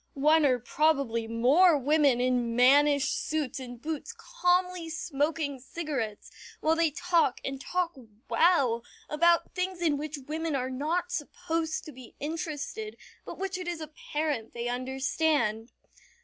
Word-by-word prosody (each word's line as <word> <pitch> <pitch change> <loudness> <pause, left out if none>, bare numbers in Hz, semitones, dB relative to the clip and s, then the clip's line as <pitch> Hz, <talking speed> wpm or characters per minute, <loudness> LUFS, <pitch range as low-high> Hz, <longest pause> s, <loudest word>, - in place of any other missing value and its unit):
One 300 +2 +4
or 255 -2 +3
probably 245 -3 +1
more 280 +10 +5
women 285 -2 +3
in 245 -2 +1
mannish 285 +3 +5
suits 300 -5 -2
and 245 -2 -8
boots 315 - -5
calmly 360 -7 0
smoking 300 -2 -2
cigarettes 265 -7 -4 0.3
while 320 +1 +2
they 330 -1 +3
talk, 335 -3 +1
and 270 0 -4
talk 360 +1 -1 0.4
well, 275 -10 +3 0.2
about 340 +2 +2
things 365 0 -2
in 315 -4 +1
which 300 +1 -5
women 315 0 -2
are 260 -1 -2
not 325 +7 -1
supposed 325 +1 -2
to 305 - -8
be 255 -3 -13
interested, 325 +7 -4 0.3
but - - -8
which 380 -1 -3
it 365 - -6
is 345 -2 -3
apparent 300 -5 -4
they 235 0 -3
understand. 255 -2 0
300 Hz, 135 wpm, -28 LUFS, 260-330 Hz, 0.4 s, more